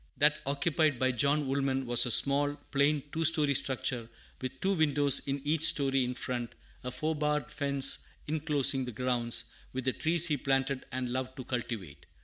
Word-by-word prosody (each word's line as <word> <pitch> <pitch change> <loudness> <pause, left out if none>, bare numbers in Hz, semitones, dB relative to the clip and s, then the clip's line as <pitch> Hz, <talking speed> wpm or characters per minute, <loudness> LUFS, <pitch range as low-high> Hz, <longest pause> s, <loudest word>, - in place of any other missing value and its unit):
That 150 +1 +4
occupied 155 0 +1
by 130 +1 +1
John 140 +5 +1
Woolman 135 -1 -1
was 120 0 +5
a - - -1
small, 145 +3 +4 0.2
plain, 140 0 +2
two 165 - -2
story 150 -3 +5
structure, 125 -3 -2 0.3
with 130 0 -6
two 195 +1 +1
windows 145 -5 +3
in 140 0 -2
each 155 +1 0
story 135 -4 +3
in 125 0 -3
front, 120 -2 -4 0.3
a 125 - -4
four 155 +5 -2
barred 150 0 -2
fence 140 -2 0 0.3
inclosing 145 -3 0
the 125 - -6
grounds, 120 0 -1 0.3
with 130 0 -4
the 130 - +1
trees 165 +1 +3
he 150 -3 0
planted 135 0 -1
and 125 0 -3
loved 130 +1 -4
to 130 - -7
cultivate. 115 - -6
135 Hz, 175 wpm, -30 LUFS, 125-150 Hz, 0.3 s, was